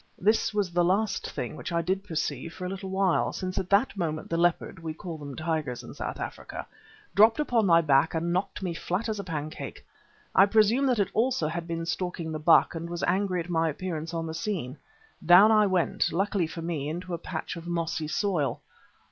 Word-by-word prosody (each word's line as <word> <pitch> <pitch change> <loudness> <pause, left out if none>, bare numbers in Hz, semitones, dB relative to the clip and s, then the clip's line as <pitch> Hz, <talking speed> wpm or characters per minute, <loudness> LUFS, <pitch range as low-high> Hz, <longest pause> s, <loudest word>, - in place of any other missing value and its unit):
This 215 +4 +2
was 205 -4 -1
the 175 0 +2
last 200 +5 +1
thing - - -5
which - - -6
I 170 0 0
did 190 +3 -1
perceive 160 -3 -3
for 185 - -6
a - - -2
little 190 0 -5
while, 190 -1 +1
since 185 0 -3
at 185 -2 -4
that 205 +5 +3
moment 160 -5 -3
the - - +1
leopard 170 0 +1
we 160 -1 -5
call 165 -1 -7
them 140 -2 -7
tigers 155 -6 -2
in - - -9
South - - -5
Africa - - -6 0.5
dropped 220 +6 +5
upon 240 -8 +2
my 170 -1 +6
back 150 +1 +3
and 170 +1 0
knocked 190 +2 -2
me 180 -2 -2
flat 185 +6 -2
as 215 -2 -2
a - - -3
pancake. 155 -3 -6 0.5
I 195 - +6
presume 220 +6 +4
that 250 -2 +2
it 200 -2 +1
also 225 -8 +1
had 165 +2 -4
been 165 -1 -3
stalking 175 -1 -3
the 155 - -3
buck 160 +2 +5
and 165 0 -5
was 175 0 -4
angry 185 0 +1
at 165 - -8
my 165 -1 +2
appearance 165 0 -4
on 165 -1 -3
the 160 - -5
scene. 165 - -3 0.5
Down 180 +6 +8
I 215 -1 +5
went, 185 -3 +1
luckily 190 0 0
for 165 +1 -7
me, 155 -4 -2
into 175 +3 -5
a 170 - -2
patch 160 0 -5
of 170 0 -8
mossy 165 -2 -2
soil. 155 -3 0
175 Hz, 215 wpm, -27 LUFS, 165-195 Hz, 0.5 s, Down